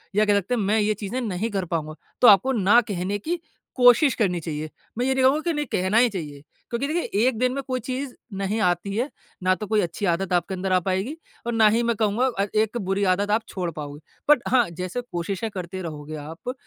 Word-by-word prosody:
या 210 +1 +4
कह 205 - +3
सकते 200 +5 -2
हैं 225 - -1
मैं 210 +3 +2
ये 210 0 +2
चीजें 210 +4 -4
नहीं 215 0 -2
कर 195 -2 -1
पाऊँगा 155 -2 -3 0.3
तो 245 - +8
आपको 205 +6 +7
ना 210 0 +5
कहने 195 +1 -2
की 335 - -3 0.4
कोशिश 245 +2 +6
करनी 185 -6 +1
चाहिए। 155 -1 -4 0.3
मैं 245 - 0
ये 265 - +2
नहीं 265 0 +1
कहूँगा 275 +4 +4
की 340 0 -1
नहीं 295 -1 -1
कहना 190 +4 +1
ही 245 -1 +5
चाहिए 150 -8 -6 0.3
क्योंकि 240 +4 -1
देखिए 335 +3 -1 0.2
1 255 -4 0
दिन 250 0 +2
में 275 - -2
कोई 255 -1 -1
चीज़ 260 +2 -4 0.2
नहीं 200 +3 -1
आती 180 +2 0
है 250 +6 0 0.3
ना 185 0 +4
तो 210 +2 -6
कोई 215 0 +2
अच्छी 175 +4 -3
आदत 180 +2 0
आपके 175 +2 +1
अंदर 185 0 -3
आ 185 - +5
पाएगी 190 - -2 0.3
और 235 - 0
ना 225 -1 +5
ही 230 +3 +2
मैं 235 -1 +1
कहूँगा 215 +4 +1
अ, 200 - +2
एक 220 +2 +1
बुरी 195 -2 -1
आदत 205 +2 -1
आप 220 +2 +3
छोड़ 180 -3 -3
पाओगे। 145 -1 -7 0.3
बट 295 -4 +6
हाँ 245 -5 +3
जैसे 180 +7 -4
कोशिशें 190 +5 -3
करते 185 -1 -6
रहोगे 155 -2 -6
आप 160 +11 -6
205 Hz, 235 wpm, -24 LUFS, 180-240 Hz, 0.4 s, तो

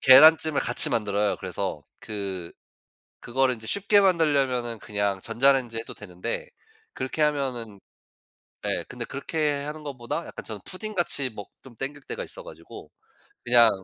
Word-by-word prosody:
계란찜을 155 +3 +8
같이 125 - +4
만들어요. 105 -3 +1
그래서 - - -4 0.2
그 95 -5 -5 0.7
그거를 130 +1 +1
인제 110 -1 -11
쉽게 200 +1 +4
만들려면은 140 -10 +2
그냥 100 -2 -1
전자레인지에 120 0 +2
해도 - - -9
되는데 100 - -5 0.5
그렇게 130 +4 -3
하면은 130 -8 -1 0.9
예 - - -1
근데 - - -5
그렇게 145 0 -1
하는 150 +1 -6
것보다 125 -5 -4
약간 - - -8
저는 110 -2 -6
푸딩같이 175 - -2
먹 105 -2 -9
좀 130 -3 -15
당길 140 +3 -5
때가 - - -5
있어 - - -9
가지고. 80 +1 -12 0.5
그냥 120 -1 +7
130 Hz, 335 characters per minute, -26 LUFS, 110-150 Hz, 0.9 s, 계란찜을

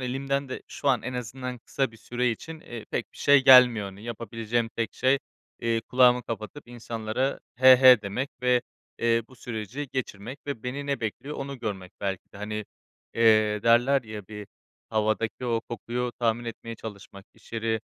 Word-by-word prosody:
elimden 135 +2 -2
de - - -6
şu 145 - -3
an 130 -3 +3
en 125 - -5
azından, 125 +1 -5
kısa 135 +2 -2
bir 115 - -16
süre 120 +2 -1
için, 160 +7 -7
eee, 120 -2 -8
pek - - -3
bir - - -16
şey 140 -1 +5
gelmiyor. 125 -6 +8
Hani, 95 +1 -10
yapabileceğim 115 0 -2
tek 115 -1 -2
şey, 130 +2 +3 0.4
eee, 115 -1 +1
kulağımı 125 +1 +4
kapatıp, 115 +4 -7
insanlara, 120 +2 -3 0.2
"he 130 +1 +8
he" 125 -3 +8
demek 105 +7 -3
ve, 125 -1 +3 0.4
eee, 115 0 +2
bu 130 - -17
süreci 120 +5 -5
geçirmek 125 0 -4
ve 140 -6 -4
beni 140 +3 -4
ne 140 -2 -1
bekliyor 130 +6 -4
onu 135 -1 -5
görmek 95 -5 -5
belki 95 -2 -4
de. - - -12
Hani, 105 +1 -4 0.5
eee, 110 -2 +4
derler 120 +4 +4
ya 110 -4 -8
bir, 105 -2 -8 0.4
"Havadaki 110 +2 0
o 115 -1 +1
kokuyu 120 +1 -4
tahmin 115 0 +1
etmeye 115 0 -6
çalışmak." 100 -2 -10
İş - - -21
yeri 110 -1 -1
120 Hz, 175 wpm, -27 LUFS, 110-130 Hz, 0.5 s, gelmiyor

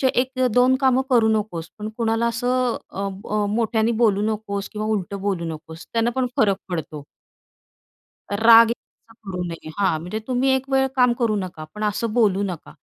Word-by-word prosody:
1-2 255 0 +2
कामं 260 -1 +3
करू 235 -4 +4
नकोस 175 -6 -5
पण 210 +1 -4
कुणाला 230 0 +1
असं 245 +1 0
अ, 200 +1 -3 0.2
अ, 210 0 +1
मोठ्याने 220 +1 +1
बोलू 205 -3 +3
नकोस 200 -2 -4
किंवा 215 0 -4
उलटं 200 -2 -2
बोलू 190 -4 -1
नकोस 160 +1 -11
त्यानं 230 +1 +1
पण 260 -1 +1
फरक 200 -3 +3
पडतो." 160 -4 -5 1.3
राग 225 +2 +7 0.5
करू 180 -2 -4
नये. 165 -2 -7
हां, 190 -6 +2
म्हणजे 180 +6 -4
तुम्ही 255 +1 +1
1 265 +1 -4
वेळ 265 0 +3
काम 250 -2 +4
करू 230 -3 +1
नका 185 -5 -5
पण 210 - -4
असं 210 +1 -1
बोलू 205 -4 +2
नका. 180 -5 -6
215 Hz, 165 wpm, -22 LUFS, 195-240 Hz, 1.3 s, राग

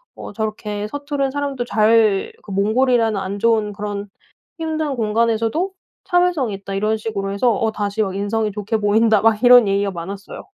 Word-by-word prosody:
어 - - -9
저렇게 210 -1 -4
서투른 285 +1 -3
사람도 280 -2 -3
잘 215 -2 +3
그 205 - -10
몽골이라는 225 +2 +2
안 195 +1 -4
좋은 220 -1 +2
그런 205 0 -5 0.5
힘든 315 -3 -2
공간에서도 230 - 0 0.3
참을성이 355 - +1
있다.' 195 0 -7
이런 215 +2 0
식으로 200 -3 -4
해서 235 +5 +2
어 220 +2 0
"다시 205 +1 -2
막 190 -3 -2
인성이 210 +1 -1
좋게 210 +2 -2
보인다." 215 +1 +3
막 225 -1 +2
이런 245 -2 +8
얘기가 200 0 +1
많았어요. 195 +4 -8
220 Hz, 365 characters per minute, -20 LUFS, 205-245 Hz, 0.5 s, 이런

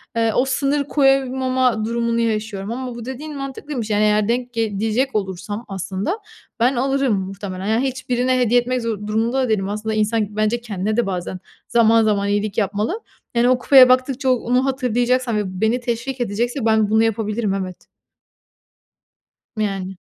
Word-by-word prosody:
eee, 225 -1 +2
o 250 - +3
sınır 280 +2 0
koyamama 260 -4 +2
durumunu 235 0 0
yaşıyorum 215 -3 -2
ama 250 0 -5
bu 235 -1 -7
dediğin 285 +4 -6
mantıklıymış 275 -3 -5
yani 210 0 +2
eğer 210 0 +3
denk 245 +1 -1
ge 220 -4 -1
diyecek 225 +5 0
olursam 205 +3 -3
aslında, 195 - -3 0.4
ben 250 +3 +3
alırım 270 0 +1
muhtemelen. 190 0 -6
Yani 225 +6 +1
hiç 260 0 -6
birine 255 +1 +2
hediye 245 0 +4
etmek 250 +1 -2
zo 215 -3 -3
durumunda 230 +5 +1
da 250 - -1
değilim. 195 -3 0
Aslında, 215 +1 -3
insan 215 -1 0
bence 215 +3 0
kendine 215 -1 -2
de 240 - +2
bazen 185 -1 -4 0.3
zaman 230 -1 +4
zaman 205 -2 +1
iyilik 205 0 -1
yapmalı. 210 - -1 0.4
Yani, 240 +1 +4
o 255 - +4
kupaya 255 0 +7
baktıkça 255 +1 +2
o - - +6
onu 250 +2 0
hatırlayacaksam 250 -2 0
ve 185 -3 -3
beni 220 +3 +2
teşvik 245 +2 -3
edecekse 240 +3 -1
ben 220 -2 +3
bunu 220 +1 +4
yapabilirim, 215 -1 -1
evet. 185 -2 -5 1.7
Yani. 195 -3 -2
230 Hz, 165 wpm, -20 LUFS, 210-255 Hz, 1.7 s, kupaya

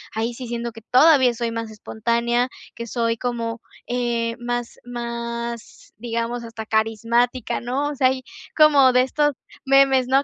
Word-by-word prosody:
Ahí 225 +2 -1
sí 250 +1 -8
siento 235 0 -4
que 225 0 -12
todavía 260 +2 +5
soy 230 0 -2
más 230 -1 -4
espontánea, 235 +3 -1 0.2
que 235 0 -7
soy 230 0 -1
como, 230 -1 -3 0.3
eh, 235 -1 -1
más 240 0 -4
más, 235 -1 -6
digamos, 235 +1 -3
hasta 230 -1 -7
carismática, 230 +3 0
¿no?, 265 +4 -1
o 295 - -5
sea, 260 -1 +4
hay 260 0 -1 0.3
como 285 -4 +6
de 250 - +5
estos 295 +3 +1 0.3
memes, 270 -1 +4
¿no?, 270 +2 +3
240 Hz, 150 wpm, -22 LUFS, 230-255 Hz, 0.3 s, como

